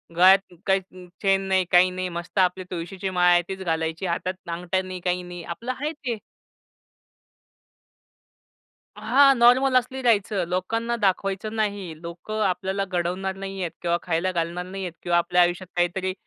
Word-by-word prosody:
गळ्यात 185 +1 +5
काही 190 -2 -1
चेन 195 -1 +3
नाही, 190 -1 +2
काही 180 +1 +6
नाही 185 0 -3
मस्त 175 +3 -4
आपली 185 0 +2
तुळशीची 185 +3 -4
माळ 180 -1 +4
आहे 175 0 +5
तीच 190 0 -5
घालायची 160 +1 -2
हातात 180 +2 -1 0.2
अंगठ्या 180 +2 -1
नाही 185 -1 -6
काही 180 0 0
नाही 175 -1 -8
आपलं 230 +10 -5
आहे 300 +2 -1
ते. 255 -7 -4 2.8
हां. 265 +6 +5
नॉर्मल, 255 +2 +5
असली 260 +1 -2
राहायचं 210 -5 +2
लोकांना 225 +6 -1
दाखवायचं 195 +2 0
नाही. 200 -7 -3
लोकं 175 +6 -5
आपल्याला 190 +2 -1
घडवणार 185 +1 -2
नाही 195 0 -6
आहेत 170 - -2
किंवा 170 0 +1
खायला 175 +2 0
घालणार 170 +1 -2
नाही 190 +1 -6
आहेत 175 -2 -5
किंवा 175 -1 +2
आपल्या 175 +1 +3
आयुष्यात 175 +1 +1
काहीतरी 185 +2 0
185 Hz, 155 wpm, -24 LUFS, 175-195 Hz, 2.8 s, काही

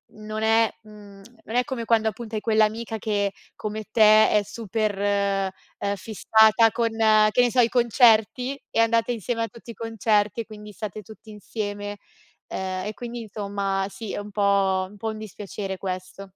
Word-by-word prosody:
non 215 0 -6
è 225 0 +4
mhmm, 205 -2 -14 0.2
non 225 - -6
è 250 - +4
come 255 -5 -4
quando 220 -1 +3
appunto 225 +1 -9
hai 210 - -2
quell'amica 220 0 +1
che 205 -2 0 0.2
come 215 0 -5
te 215 -1 +6
è 210 - +3
super, 215 -1 -3 0.8
uhm, 200 0 -1
fissata 220 +2 +4
con, 230 -1 0 0.4
che 245 - +3
ne 245 -1 +2
so, 255 - +1
i 235 - +3
concerti 245 +2 +3
e - - 0
andate 230 +1 +3
insieme 230 0 -2
a - - -2
tutti 235 +1 -15
i - - -9
concerti 225 -1 0
e - - -8
quindi 210 -1 -11
state 215 0 -6
tutti 220 +1 -14
insieme, 205 0 -5 0.5
uhm, - - -5 0.3
e 210 - -3
quindi, 240 -1 -6
insomma, 200 -2 -2
sì, 200 +1 -7
è - - -3
un 205 0 -8
po' 195 -2 +2
un 205 - -15
po' 220 +1 -3
dispiacere 205 -2 -6
questo. 185 0 -6
215 Hz, 170 wpm, -24 LUFS, 205-230 Hz, 0.8 s, te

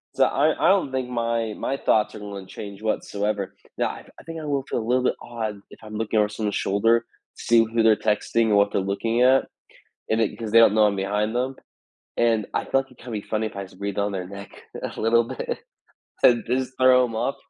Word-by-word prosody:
So - - +5
I 150 +3 +2
I - - +6
don't 190 -8 +2
think 130 -1 -2
my 115 -2 -1
my 135 - -2
thoughts 110 -5 +1
are - - -7
gonna 100 -2 -7
change 100 +1 -9
whatsoever. 100 -2 -2 0.2
Now, - - +1
I - - -8
I - - -14
think 165 -1 -7
I 155 - -7
will 140 -2 -1
feel 125 - -3
a 110 - -5
little 125 +1 +2
bit - - +1
odd 110 -4 -5
if - - -15
I'm 110 0 -9
looking 110 0 0
over 105 0 +2
someone's 105 -1 -3
shoulder, 115 +4 +2 0.3
seeing 115 -1 +3
who 115 0 +1
they're 110 -1 +6
texting 110 +2 +1
or 105 - +3
what 100 0 +4
they're - - +1
looking 115 +5 -1
at, 130 +1 +5 0.6
and 110 +1 +2
it 110 - -1
'cause 110 -2 -4
they 115 - +7
don't 115 -3 +6
know 110 -1 +5
I'm 100 - 0
behind 105 +3 -1
them, 130 +2 -1 0.6
and 115 -3 +2
I - - 0
thought, - - -16
like, 135 - -20
it - - -22
can 120 -1 -9
be 105 - -2
funny 110 +1 -2
if 105 - -7
I 100 - -5
breathe 100 +2 -6
on 100 0 0
their 90 -2 -4
neck 100 +1 -9 0.3
a - - -5
little 115 +1 +3
bit, - - -4 0.6
and 120 -2 +5
just 130 +2 -1
throw 130 -1 +6
'em 115 -2 -4
off. 135 +5 -1
110 Hz, 235 wpm, -24 LUFS, 105-120 Hz, 0.6 s, they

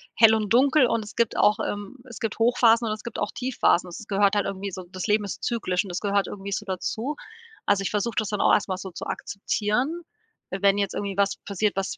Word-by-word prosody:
hell 220 0 +7
und 215 -1 -1
dunkel, 270 +3 +5
und 230 -1 0
es 210 - -11
gibt 235 -2 +1
auch, 210 +2 +4
ähm 205 +4 -4
es 240 - -10
gibt 225 -1 -3
Hochphasen 235 0 +4
und 215 - 0
es 215 - -8
gibt 235 - -6
auch 210 - -1
Tiefphasen. 250 -8 +1
Das 170 - -8
gehört 200 0 +2
halt 205 - +1
irgendwie 195 0 -4
so 185 0 -7
das 185 +1 -4
Leben 210 -1 +2
ist 200 - -6
zyklisch 190 -7 0
und 200 - -9
das 175 - -3
gehört 200 -1 +1
irgendwie 200 0 -7
so 210 - -3
dazu. 220 +8 -3 0.5
Also, 200 -1 +3
ich 195 - -1
versuch 210 +2 -1
das 215 -3 0
dann 210 - -2
auch - - +4
erst 205 - +2
mal 185 - -1
so 190 0 -7
zu - - -7
akzeptieren, 235 +11 -2 0.5
äh, 190 - -3
wenn 200 0 +4
jetzt 200 -1 -1
irgendwie 200 -1 -4
was 200 0 +2
passiert, 200 +1 -1
was 195 0 -2
205 Hz, 245 wpm, -25 LUFS, 195-225 Hz, 0.5 s, hell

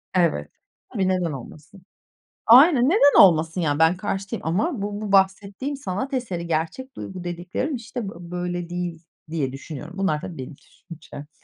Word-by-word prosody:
Evet. 170 -3 +1 0.4
Tabii, 195 -4 0
neden 180 -3 0
olmasın? 155 - -10 0.6
Aynen, 260 +2 +7
neden 305 -7 +6
olmasın? 165 -1 +4
Yani, 145 -1 0
ben 160 +2 +4
karşı 195 +1 -4
değilim 230 - -3
ama 210 - 0
bu 205 +1 -4
bu 205 -2 -4
bahsettiğim 195 +7 +1
sanat 265 +2 -4
eseri, 190 -10 -3
gerçek 170 +12 -3
duygu 185 -2 -7
dediklerim 175 - -3
işte 235 -3 -5
bö - - -9 0.2
böyle 175 -1 -3
değil, 175 -2 -4 0.3
diye 145 -5 -2
düşünüyorum. 150 +5 -8
Bunlar 190 -6 0
tabii, 170 - -7
benim 130 +3 -7
düşüncem. 150 -3 -12
185 Hz, 155 wpm, -23 LUFS, 165-215 Hz, 0.6 s, Aynen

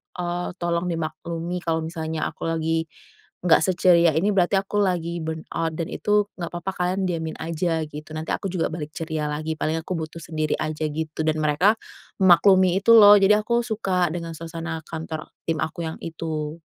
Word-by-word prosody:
eee, 175 0 -3
tolong 170 0 -1
dimaklumi 170 +1 -3
kalau 160 -1 0
misalnya 160 -1 -4
aku - - -6
lagi 165 0 0 0.6
nggak 175 - +6
seceria 175 -2 +4
ini, 190 +6 +2
berarti 185 +1 +3
aku 205 +1 -2
lagi 170 -3 0
burnout 160 0 -3
dan 165 -1 -3
itu 210 -1 +1
nggak 170 -1 -4
papa, 175 +2 -3
kalian 180 +2 0
diamin 160 -2 -3
aja 165 0 -1
gitu, 155 +1 -9
nanti 155 0 -4
aku 195 - -2
juga 180 -3 0
balik 155 -2 -5
ceria 155 -2 -3
lagi 155 +1 -3
paling 160 +1 0
aku 185 - -4
butuh 160 +1 -6
sendiri 155 -1 -1
aja 155 0 -2
gitu, 155 +1 -5
dan 155 - +2
mereka 155 +9 +3 0.5
memaklumi 185 +1 +6
itu 230 +4 +5
loh, 205 -1 +10
jadi 210 +2 +5
aku 235 +1 +1
suka 190 -6 0
dengan 170 -1 -5
suasana 165 0 -5
kantor 160 -1 -6 0.2
tim 160 -2 0
aku 155 +2 -3
yang 160 - -5
itu. 160 -2 -4
165 Hz, 175 wpm, -24 LUFS, 160-180 Hz, 0.6 s, loh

